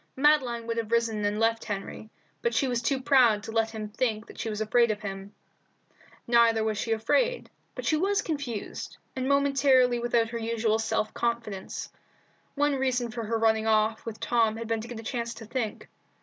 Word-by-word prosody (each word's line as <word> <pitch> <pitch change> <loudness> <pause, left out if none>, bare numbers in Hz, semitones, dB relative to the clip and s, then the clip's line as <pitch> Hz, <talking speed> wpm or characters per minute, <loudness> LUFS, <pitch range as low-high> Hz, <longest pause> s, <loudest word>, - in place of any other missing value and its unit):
Madeline 260 -5 +3
would 230 0 -3
have 225 -1 -3
risen 230 -2 +1
and 205 +1 0
left 225 0 +1
Henry, 205 +1 -6 0.3
but 470 - 0
she 275 - +2
was 245 -2 0
too 260 +3 0
proud 240 -5 +4
to 225 - -6
let 225 0 +1
him 220 -1 -5
think 215 0 -2
that - - -13
she 225 - -2
was 210 -1 -4
afraid 235 +2 +3
of 215 -1 -2
him.. 195 -1 -6 0.9
Neither 230 -2 +4
was 215 -2 -1
she 225 - -2
afraid, 480 - +1 0.2
but - - -6
she 310 - +2
was 395 +5 +1
confused, 280 -9 -5 0.2
and 260 0 -2
momentarily 275 -3 +4
without 235 -1 +1
her 235 0 -4
usual 225 -1 0
self 220 -1 -1
confidence. 230 -5 -3 0.6
One 290 -1 +2
reason 250 -3 0
for 230 -1 -4
her 225 +1 0
running 220 0 +2
off 220 0 +2
with 220 -2 -7
Tom 225 -2 +2
had 230 0 -5
been 225 -1 -1
to 230 - -8
get 240 -2 -7
a - - -8
chance 235 -1 -3
to 225 - -10
think. 230 -1 -4
230 Hz, 195 wpm, -27 LUFS, 220-250 Hz, 0.9 s, proud